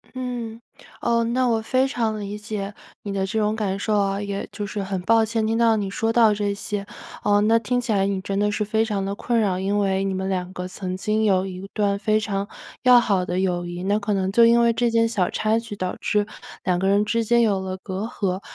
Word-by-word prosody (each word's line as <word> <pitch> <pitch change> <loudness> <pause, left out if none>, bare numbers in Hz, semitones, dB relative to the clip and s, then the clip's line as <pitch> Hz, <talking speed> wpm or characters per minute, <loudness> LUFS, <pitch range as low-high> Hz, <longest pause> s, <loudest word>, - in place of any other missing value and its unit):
嗯， 240 -3 -5 0.4
哦， 235 0 +2
那 250 +2 +1
我 225 -2 +1
非 255 +4 +1
常 225 -5 -1
理 205 0 -5
解 210 -1 -5 0.3
你 200 - -4
的 195 -1 -1
这 220 +3 -2
种 210 +1 +1
感 200 -3 -1
受 210 +1 0
啊， 195 0 0
也 200 -1 -4
就 205 - -4
是 200 +1 -4
很 190 -1 -3
抱 225 +4 +4
歉 220 0 -1
听 225 +1 0
到 230 -1 +4
你 200 -3 -2
说 225 +3 -1
到 225 -3 +5
这 205 -1 -1
些。 200 0 -4 0.4
呃， 205 0 +3
那 225 +2 +4
听 245 +3 0
起 235 - -3
来 195 -2 +2
你 195 -1 -1
真 195 +1 -2
的 210 0 +2
是 210 - -1
非 220 +1 +1
常 205 -3 -2
得 200 - -2
困 235 +1 0
扰， 190 -4 +1
因 200 +2 0
为 195 -1 +1
你 195 - -1
们 190 0 -2
2 180 -1 -2
个 180 -1 -5
曾 185 0 -5
经 215 +3 0
有 190 -3 +3
一 190 +1 -7
段 200 -2 +1
非 215 +1 +2
常 200 -2 -2 0.4
要 250 -1 +8
好 195 -6 +1
的 180 +1 -2
友 175 -2 0
谊， 175 +1 -6
那 205 +2 +1
可 210 0 -1
能 190 -1 0
就 230 +3 +6
因 235 +1 +5
为 235 0 +4
这 240 +1 +1
件 230 0 +3
小 200 -6 0
插 220 +1 +1
曲， 230 -3 -7
导 185 -2 -3
致 210 -1 +1 0.4
2 180 -1 +1
个 190 - 0
人 200 +1 +4
之 230 +2 0
间 235 +2 +4
有 205 -4 +2
了 190 0 -4
隔 190 +2 -5
阂。 195 -5 -2
205 Hz, 260 characters per minute, -23 LUFS, 195-225 Hz, 0.4 s, 要